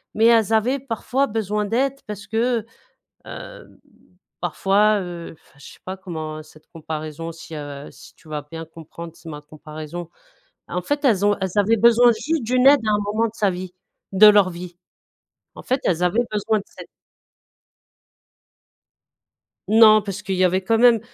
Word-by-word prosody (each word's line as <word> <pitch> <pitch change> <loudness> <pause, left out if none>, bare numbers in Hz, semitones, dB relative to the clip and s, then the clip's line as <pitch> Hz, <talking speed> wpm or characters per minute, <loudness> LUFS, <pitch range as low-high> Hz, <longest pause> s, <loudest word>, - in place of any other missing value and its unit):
mais 220 - +3
elles 225 -2 +4
avaient 245 +5 +2
parfois 265 +1 -1
besoin 210 -2 -2
d'aide 255 +6 0
parce 205 -1 -8
que, 230 +1 0 0.6
hem, - - -11 0.6
parfois, 210 +2 +2
heu, 175 -2 -7
enfin, - - -27
je - - -14
sais - - -19
pas 185 - -5
comment 155 -4 -7
cette 155 0 -20
comparaison 155 0 -6
si, 165 0 -11
heu, 145 -1 -8
si - - -16
tu - - -22
vas 150 -1 -5
bien 165 0 -7
comprendre, 165 +1 -11
tu - - -21
sais, 165 - -10
ma 150 -1 -8
comparaison, 155 +2 -9 0.6
en 180 - -3
fait, 290 - -2
elles 205 -6 +3
ont 205 0 +2
elles 190 -1 -2
avaient 210 +3 +3
besoin 235 +2 +6
juste 300 +6 -2
d'une 250 +3 +3
aide 285 0 +7
à 215 - +1
un 210 - +2
moment 225 +2 +1
de 215 - -11
sa 205 - +1
vie 180 0 -7 0.4
de 205 +3 +8
leur 205 -3 +6
vie, 175 0 -9 0.8
en - - -10
fait, 260 +1 0
elles 175 0 +1
avaient 220 +7 +1
besoin 215 +1 0
de 200 - -11
cette - - -12 2.8
Non, 215 0 +7
parce 200 -1 -6
qu'il 190 -1 -2
y 185 - +2
avait 185 +1 +2
quand 225 +3 +1
même 240 -1 +6
200 Hz, 175 wpm, -21 LUFS, 165-225 Hz, 2.8 s, de